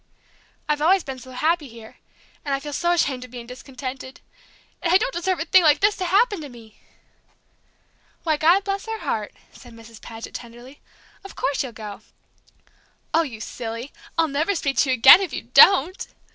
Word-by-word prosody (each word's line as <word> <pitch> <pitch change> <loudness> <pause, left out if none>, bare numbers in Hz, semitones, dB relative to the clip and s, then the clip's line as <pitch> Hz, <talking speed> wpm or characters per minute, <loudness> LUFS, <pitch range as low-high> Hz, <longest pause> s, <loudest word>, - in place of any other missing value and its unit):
I've 300 -1 -1
always 365 +3 +3
been 265 -2 -7
so 260 - -13
happy 310 +4 -1
here, 225 -2 -14 0.5
and 280 -2 -1
I - - -4
feel 295 +1 -8
so 345 +4 0
ashamed 275 -7 -1
of 255 - -11
being 240 -1 -9
discontented, 255 +1 -9 0.6
and 335 - 0
I 365 - +7
don't - - -3
deserve 360 +1 -2
a 325 - -3
thing 370 +2 +5
like 310 -3 +4
this 410 +1 +2
to 370 - -3
happen 405 +1 +2
to 290 - -8
me!" 225 -3 -16 1.4
"Why, 315 -2 +1
God 340 +6 +3
bless 395 +1 -4
her 445 0 -5
heart!" 210 -2 -3 0.2
said 245 -2 -15
Mrs. 230 -1 -15
Paget, 225 0 -10
tenderly, 240 +4 -11 0.4
"of 390 - -12
course 280 - -1
you'll 260 - -5
go!" 210 -2 -9 1.1
"Oh, 325 - +4
you 255 -9 -6
silly! 230 +4 -7 0.2
I'll 325 -1 +3
never 310 +7 -1
speak 275 -6 -2
to 270 - +2
you 260 - +2
again 255 +10 +8
if 380 - -4
you - - -5
don't!" 370 -1 +5
285 Hz, 185 wpm, -22 LUFS, 245-350 Hz, 1.4 s, again